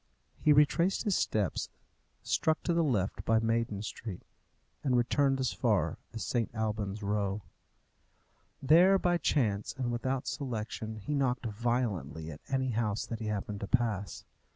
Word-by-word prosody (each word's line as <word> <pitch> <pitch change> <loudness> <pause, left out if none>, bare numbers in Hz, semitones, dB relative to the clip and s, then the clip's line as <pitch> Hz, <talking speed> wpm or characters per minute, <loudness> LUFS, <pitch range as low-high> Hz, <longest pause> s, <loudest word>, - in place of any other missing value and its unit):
He 150 - +4
retraced 150 +6 +4
his 205 -5 +1
steps, 105 -5 0 0.5
struck 160 0 +1
to 175 - +1
the 170 0 +3
left 110 -10 0
by 115 - +3
Maiden 115 -2 0
Street, 105 -3 -6 0.6
and 130 -3 +2
returned 135 +3 +2
as 130 -2 0
far - - +1
as 110 - -5
St. 120 -3 0
Alban's 105 -2 -2
Row. 100 0 -1 1.2
There, 175 +7 +6
by 175 -2 +1
chance 110 -9 0
and 125 -2 -1
without 130 +2 -1
selection, 115 -4 -4
he 110 +7 -4
knocked 130 -3 0
violently 105 - -2
at 70 - -10
any 130 -1 0
house 110 -2 -1
that 115 - -5
he 110 - -4
happened 105 -1 -3
to 100 - -4
pass. 110 -5 -1
115 Hz, 150 wpm, -31 LUFS, 105-135 Hz, 1.2 s, There